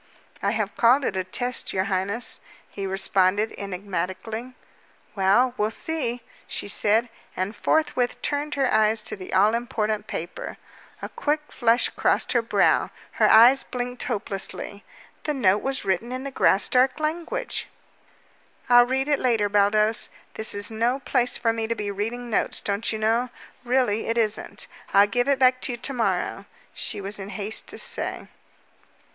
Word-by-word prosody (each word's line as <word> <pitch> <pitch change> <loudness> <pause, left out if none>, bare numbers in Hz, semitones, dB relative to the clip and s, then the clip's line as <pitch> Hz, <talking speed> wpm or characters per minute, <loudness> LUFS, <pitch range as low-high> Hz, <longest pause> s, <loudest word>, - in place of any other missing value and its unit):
"I 200 - +1
have 210 -1 -2
called 255 +4 +4
it - - -1
a 185 - 0
test, 245 +7 -2
your 185 - +1
highness," 195 +5 -1 0.3
he 195 -1 -5
responded 195 +2 +2
enigmatically. 200 +5 -5 0.6
"Well, 205 +6 +3
we'll 210 +1 +1
see," 245 -2 -2 0.2
she - - -4
said, 220 +3 +2 0.3
and 190 +4 -2
forthwith 255 -6 0
turned 290 +1 -1
her 270 -2 +1
eyes 215 0 +3
to - - -1
the 185 -2 -9
all 205 +4 +4
important 215 -3 -2
paper. 170 -4 -6 0.5
A - - -4
quick 300 0 -2
flush 235 +1 +2
crossed - - 0
her 240 - +3
brow; 230 - +2 0.3
her - - +6
eyes 245 +5 +7
blinked 245 0 -5
hopelessly. 200 -2 -3 0.4
The 300 - -1
note 205 -6 +3
was 270 -4 -1
written 195 +5 -1
in 255 +1 -4
the 275 - -5
Graustark 255 +5 +3
language! 340 +11 -3 1.0
"I'll 245 0 +7
read 265 +2 0
it 290 -2 +2
later, 225 -5 +1
Baldos. 210 +2 +2 0.2
This 220 -1 -1
is 205 +2 0
no 235 +4 +1
place 250 -2 0
for 225 -1 +1
me 225 -1 -2
to 230 - -1
be 205 -2 -3
reading 225 +5 -4
notes, 225 - 0
don't 200 +2 -1
you 220 - -2
know? 225 +3 +1 0.3
Really, 245 -4 +1
it 230 +1 0
isn't. 220 -2 -1 0.3
I'll 200 +1 +8
give 245 +5 0
it 280 -1 +3
back 255 -1 +4
to 245 - -2
you - - -5
to 265 +3 -4
morrow," 235 -3 -1 0.3
she - - -3
was 200 +1 -5
in 195 0 -7
haste 210 +1 -4
to - - -7
say. - - -3
225 Hz, 165 wpm, -24 LUFS, 205-250 Hz, 1.0 s, I'll